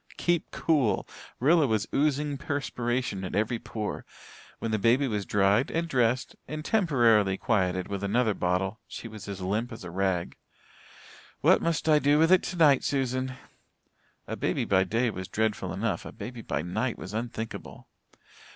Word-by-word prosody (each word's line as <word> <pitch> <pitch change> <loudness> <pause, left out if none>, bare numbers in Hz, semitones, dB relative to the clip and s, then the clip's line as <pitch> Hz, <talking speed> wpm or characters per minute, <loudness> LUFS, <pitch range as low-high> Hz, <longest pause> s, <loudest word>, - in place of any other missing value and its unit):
Keep 175 -2 0
cool! 145 -9 +1 0.3
Rilla 155 +3 +4
was 110 -3 +1
oozing 145 0 +1
perspiration 125 - -2
at 90 - -4
every 110 +3 0
pore. 110 -2 -5 0.5
When 115 - -3
the 110 - +1
baby 125 +6 +3
was 105 -4 -2
dried 100 +4 +3
and 170 +1 -1
dressed 125 -3 +1
and 155 0 -5
temporarily 120 - +3
quieted 95 -4 0
with 100 -1 -4
another 110 +2 +2
bottle 95 +4 -1
she - - -7
was 110 -2 -10
as 100 -2 -6
limp 105 +6 -1
as 115 - -8
a 90 - -7
rag. 95 -1 -1 1.0
"What - - +5
must 165 -1 -1
I 155 -1 +6
do 145 +1 +3
with 165 +3 +4
it 185 - +6
tonight, 155 -7 +3
Susan?" 130 -1 -1 0.9
A - - -4
baby - - -1
by 95 -1 +3
day 115 +5 +1
was 95 -2 -6
dreadful 105 -4 -1
enough; 100 +4 -2
a - - -8
baby 115 +2 -8
by 75 - -2
night 110 +8 -2
was 95 - -8
unthinkable. 115 0 -5
115 Hz, 160 wpm, -28 LUFS, 100-140 Hz, 1.0 s, I